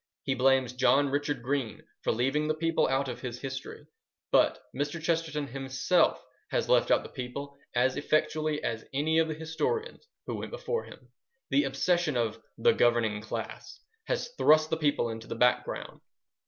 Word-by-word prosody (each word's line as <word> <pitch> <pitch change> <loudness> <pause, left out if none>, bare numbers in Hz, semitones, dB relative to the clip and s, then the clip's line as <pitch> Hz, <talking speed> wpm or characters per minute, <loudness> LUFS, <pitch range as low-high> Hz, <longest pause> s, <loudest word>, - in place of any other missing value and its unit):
He 135 - 0
blames 130 -1 +3
John 135 +3 +3
Richard 145 -1 -1
Green 130 -4 -2 0.2
for - - +1
leaving 135 +6 +1
the 155 - +1
people 165 +1 +1
out 135 +1 +1
of 125 -1 -6
his 125 -2 -5
history; 135 +2 -6 0.5
but - - +4 0.2
Mr. 145 +4 -2
Chesterton 160 -2 -1
himself 135 +6 +1 0.2
has - - 0
left - - +4
out - - +4
the - - -9
people 140 +3 -6 0.2
as 130 +2 +3
effectually 155 0 0
as 115 -1 -2
any 160 +3 +2
of 165 - +3
the 155 - -3
historians 440 - -3 0.2
who - - -4
went - - -5
before - - -3
him. - - -15 0.4
The 285 - +4
obsession 175 -6 +1
of 115 -1 -1 0.2
"the 115 - +5
governing 115 -3 +2
class" 110 - -6 0.3
has 485 -1 -2
thrust 155 0 +5
the 160 - +1
people 145 -6 +1
into 110 0 -7
the - - -4
background. 125 +1 0
140 Hz, 165 wpm, -29 LUFS, 125-160 Hz, 0.5 s, the